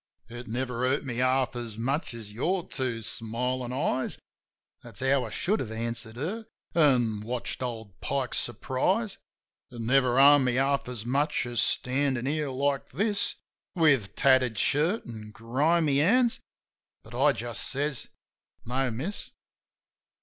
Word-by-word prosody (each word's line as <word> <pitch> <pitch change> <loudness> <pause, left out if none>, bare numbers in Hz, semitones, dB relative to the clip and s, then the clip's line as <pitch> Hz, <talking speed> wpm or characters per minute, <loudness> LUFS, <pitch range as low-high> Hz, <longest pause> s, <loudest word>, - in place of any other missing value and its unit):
"It 120 +1 -8
never 125 +1 -3
hurt 130 +4 +1
me 120 -3 -4
half 130 0 +2
as 115 -3 -6
much 130 +3 -2
as 110 -3 -9
your 175 - -1
two 120 -4 -3
smilin' 125 +3 -3
eyes." 130 0 -1 0.6
That's 115 -5 -11
how 135 -1 +2
I - - -6
could 200 - 0
have 110 - -4
answered 115 0 -4
her 195 - -4
— - - -41
an' 125 -9 +3
watched 120 +4 -4
old 110 -6 -5
Pike's 135 -3 0
surprise 185 - -1 0.3
— - - -66
"It 120 - -10
never 125 +1 +3
harmed 140 0 +7
me 125 -1 +1
half 135 0 +1
as 120 -3 -6
much 140 +4 +1
as 120 -2 -2
standin' 130 -1 +1
here 150 +1 -1
like 135 +1 -1
this 205 - +1 0.4
With 140 - +3
tattered 130 -4 +3
shirt 155 - +1
an' 110 -3 -8
grimy 140 +7 +1
hands"... 235 - +3 0.6
But 110 - -14
I 140 +4 +4
just 120 -3 -4
says, 140 -1 -1 0.6
"No, 130 +2 0
Miss." 140 - -4
130 Hz, 150 wpm, -28 LUFS, 120-145 Hz, 0.6 s, harmed